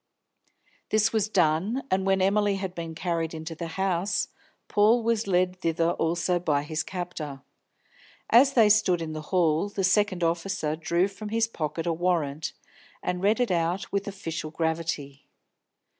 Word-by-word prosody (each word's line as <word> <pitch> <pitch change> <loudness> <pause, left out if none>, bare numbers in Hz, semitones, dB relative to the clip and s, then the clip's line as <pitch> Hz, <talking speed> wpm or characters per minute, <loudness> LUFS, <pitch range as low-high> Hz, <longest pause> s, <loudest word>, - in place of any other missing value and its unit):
This 215 +1 +2
was 215 -1 +1
done, 185 +7 +1
and 190 +1 +1
when 195 -1 +3
Emily 205 +1 +2
had 190 -2 -4
been 165 -2 -6
carried 165 -1 -2
into 160 +1 -6
the 165 +1 -5
house, 190 0 0 0.4
Paul 220 +3 +4
was 230 -2 0
led 180 -1 +1
thither 165 0 +1
also 175 +2 0
by 150 -4 0
his 155 +1 -2
captor. 160 -7 -6 0.9
As 270 +4 +6
they 230 -4 +6
stood 205 -4 +4
in 155 -1 -5
the 155 - -5
hall, 170 0 +2
the 200 -1 -3
second 190 -1 +2
officer 165 -2 -1
drew 170 +3 +1
from 200 +2 -8
his 225 +1 +1
pocket 165 -5 -4
a 170 - +1
warrant, 160 -4 -1 0.5
and 180 0 -2
read 210 +5 +2
it 245 -5 +1
out 175 +2 -1
with 200 0 -1
official 170 -5 -5
gravity. 160 -4 -3
180 Hz, 160 wpm, -26 LUFS, 165-200 Hz, 0.9 s, As